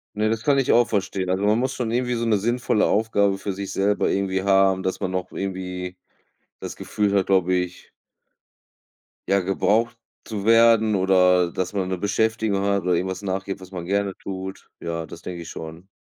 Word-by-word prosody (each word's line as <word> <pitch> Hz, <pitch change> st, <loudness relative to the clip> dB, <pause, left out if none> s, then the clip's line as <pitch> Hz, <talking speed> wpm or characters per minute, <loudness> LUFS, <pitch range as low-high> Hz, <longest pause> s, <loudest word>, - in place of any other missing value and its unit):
Ne, 110 Hz, +1 st, +1 dB
das 110 Hz, 0 st, -1 dB
kann 140 Hz, +2 st, +3 dB
ich 135 Hz, -, +2 dB
auch 120 Hz, 0 st, +4 dB
verstehen. 95 Hz, -2 st, -2 dB
Also, 95 Hz, +2 st, 0 dB
man 105 Hz, +2 st, +3 dB
muss 130 Hz, +2 st, -1 dB
schon 120 Hz, -3 st, -2 dB
irgendwie 125 Hz, +1 st, 0 dB
so 115 Hz, 0 st, -1 dB
'ne 110 Hz, -2 st, +3 dB
sinnvolle 120 Hz, 0 st, +1 dB
Aufgabe 100 Hz, -2 st, +2 dB
für 100 Hz, +1 st, -3 dB
sich 100 Hz, +1 st, -5 dB
selber 100 Hz, +1 st, +1 dB
irgendwie 95 Hz, -1 st, 0 dB
haben, 95 Hz, -1 st, +3 dB
dass 95 Hz, -, -2 dB
man 95 Hz, -3 st, -2 dB
noch 95 Hz, -1 st, -3 dB
irgendwie 90 Hz, -1 st, -5 dB, 0.6 s
das -, -, -6 dB
Gefühl 105 Hz, -1 st, -1 dB
hat 100 Hz, -2 st, +2 dB
glaube 95 Hz, -2 st, +3 dB
ich 90 Hz, 0 st, -4 dB, 1.4 s
ja 100 Hz, 0 st, +3 dB
gebraucht 105 Hz, +5 st, +1 dB, 0.3 s
zu 105 Hz, -2 st, -5 dB
werden 115 Hz, -1 st, +5 dB
oder, 90 Hz, -2 st, +4 dB
äh, -, -, -12 dB
dass 95 Hz, +2 st, -3 dB
man 95 Hz, -2 st, -1 dB
'ne 95 Hz, -1 st, -2 dB
Beschäftigung 110 Hz, 0 st, 0 dB
hat 100 Hz, -1 st, +1 dB
oder 90 Hz, 0 st, +1 dB
irgendwas 95 Hz, +1 st, -2 dB
nachgeht, 95 Hz, -1 st, -4 dB
was 95 Hz, 0 st, -12 dB
man 90 Hz, -2 st, -5 dB
gerne 100 Hz, +1 st, -1 dB
tut. 95 Hz, 0 st, -7 dB
Ja, 85 Hz, -1 st, -4 dB
das 80 Hz, -, -10 dB
denke 90 Hz, -1 st, -7 dB
ich 85 Hz, -, -9 dB
schon. 80 Hz, +3 st, -9 dB
95 Hz, 195 wpm, -23 LUFS, 95-110 Hz, 1.4 s, werden